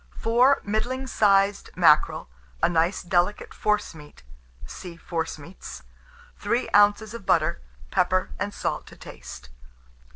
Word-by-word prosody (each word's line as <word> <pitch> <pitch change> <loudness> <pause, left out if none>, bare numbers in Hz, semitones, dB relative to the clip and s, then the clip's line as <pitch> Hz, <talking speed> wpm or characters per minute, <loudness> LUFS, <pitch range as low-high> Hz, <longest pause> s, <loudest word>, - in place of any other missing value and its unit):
4 245 +5 +3
middling 240 +6 -2
sized 200 -4 +2
mackerel, 155 - +3 0.4
a - - +6
nice 170 +2 0
delicate 175 +3 0
forcemeat 165 - -3 0.4
(see 175 -2 -10
Forcemeats), 165 0 -6 0.6
3 235 +2 -1
oz. 205 +1 +4
of 230 -5 -9
butter; 65 - +1 0.3
pepper 185 +1 +1
and 200 0 -2
salt - - -4
to - - -13
taste. 60 +1 -11
195 Hz, 110 wpm, -25 LUFS, 170-215 Hz, 0.6 s, a